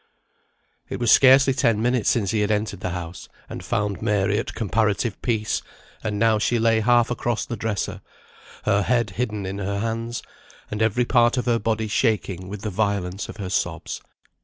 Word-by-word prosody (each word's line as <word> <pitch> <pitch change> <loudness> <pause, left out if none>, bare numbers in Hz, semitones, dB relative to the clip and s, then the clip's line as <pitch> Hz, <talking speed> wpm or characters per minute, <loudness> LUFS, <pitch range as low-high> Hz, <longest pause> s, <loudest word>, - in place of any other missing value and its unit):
It - - -4
was 120 -2 +3
scarcely 135 0 +7
ten 120 -5 +2
minutes 125 0 +1
since 100 -6 +1
he 110 - 0
had 105 0 +1
entered 105 -2 -1
the 95 - -3
house, 85 0 -6 0.2
and - - -7
found 100 -2 -1
Mary 105 -1 +1
at - - -5
comparative 110 0 0
peace, 110 -3 0 0.4
and 105 -2 -2
now 110 0 +3
she 120 +3 +1
lay 115 -1 +3
half 120 +1 +3
across 120 -2 -1
the 120 - -4
dresser, 110 -1 -3 0.6
her 100 -1 +2
head 120 -1 +1
hidden 105 -1 -3
in 95 +1 -4
her 100 0 -2
hands, 115 +2 -3 0.5
and 105 +1 -3
every 115 +2 +2
part 120 0 +3
of 125 - 0
her 120 -2 +2
body 110 0 -1
shaking 105 -5 0
with 100 +1 -7
the 105 0 -3
violence 100 -2 -1
of - - -8
her 95 -4 -5
sobs. - - -2
110 Hz, 185 wpm, -23 LUFS, 100-120 Hz, 0.6 s, scarcely